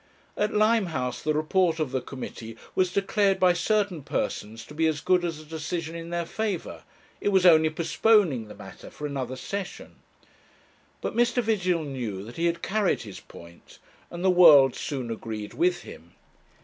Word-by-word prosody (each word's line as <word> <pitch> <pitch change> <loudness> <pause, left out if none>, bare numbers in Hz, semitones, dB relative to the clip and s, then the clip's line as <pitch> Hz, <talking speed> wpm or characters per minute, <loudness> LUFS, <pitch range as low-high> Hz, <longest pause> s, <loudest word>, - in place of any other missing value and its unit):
At 210 0 0
Limehouse 205 - +1
the 155 0 0
report 165 +2 +1
of 155 -5 -1
the 130 -1 -1
committee 115 -4 -8 0.2
was 185 -1 +1
declared 200 0 +1
by 180 -1 +5
certain 195 -1 0
persons 115 -4 -4
to - - -12
be 160 +1 +1
as 155 -2 -1
good 180 +2 +2
as 165 -3 -3
a 155 - -12
decision 160 +1 -4
in 170 0 -7
their 170 0 -2
favour; 210 0 -4 0.4
it - - 0
was 190 -2 +3
only 160 -3 +6
postponing 165 - +2
the - - -11
matter - - -11
for 150 - -8
another 135 -3 -4
session. 195 +8 -6 1.0
But - - -4
Mr. 240 +1 +2
Vigil 185 -6 0
knew 120 -9 -5
that 115 +3 -11
he 170 +1 +1
had 170 0 -2
carried 205 -1 0
his 100 -4 -9
point, 85 0 -15 0.3
and 175 +2 -5
the 190 - +5
world 150 -8 +7
soon 130 -5 -4
agreed 110 -2 -6
with 360 +2 +1
him. - - -13
165 Hz, 175 wpm, -26 LUFS, 135-190 Hz, 1.0 s, world